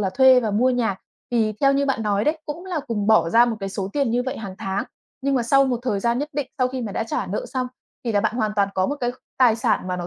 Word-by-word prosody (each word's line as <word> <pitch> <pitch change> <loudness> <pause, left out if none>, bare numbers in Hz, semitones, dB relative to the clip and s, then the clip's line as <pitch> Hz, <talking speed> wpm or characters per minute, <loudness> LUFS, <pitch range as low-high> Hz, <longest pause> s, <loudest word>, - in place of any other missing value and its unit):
là 190 -2 0
thuê 260 +3 +6
và 220 - -1
mua 240 +6 +3
nhà. 230 -6 0 0.3
Thì 220 -3 +1
theo 275 -1 +5
như 280 0 +1
bạn 230 -5 0
nói 205 0 +1
đấy, 310 +1 +1
cũng 330 +5 -6
là 355 -5 -2
cùng 210 -5 -3
bỏ 220 -6 +4
ra 230 +6 +6
một 235 -2 -2
cái 195 - -3
số 195 0 -4
tiền 280 -5 +1
như 245 +1 +1
vậy 260 +2 -4
hàng 195 -4 -7
tháng, 195 +1 -2 0.4
nhưng 275 0 +1
mà 245 - +2
sau 275 +3 +4
một 250 -3 0
thời 210 -6 -1
gian 235 +3 +1
nhất 295 +2 -2
định 290 -1 -2
sau 255 0 +2
khi 255 -1 -4
mà 205 -3 -4
đã 225 - -2
trả - - -2
nợ 200 - -3
xong 255 -1 -2 0.4
thì 230 - -1
là 205 - +3
bạn 220 - 0
hoàn 215 -3 0
toàn 200 -1 +3
có 185 0 +1
một 290 - -2
cái 245 -1 0 0.3
tài 240 -4 +5
sản 185 - 0
mà 180 - -1
nó 175 -1 -4
235 Hz, 305 wpm, -23 LUFS, 205-265 Hz, 0.4 s, thuê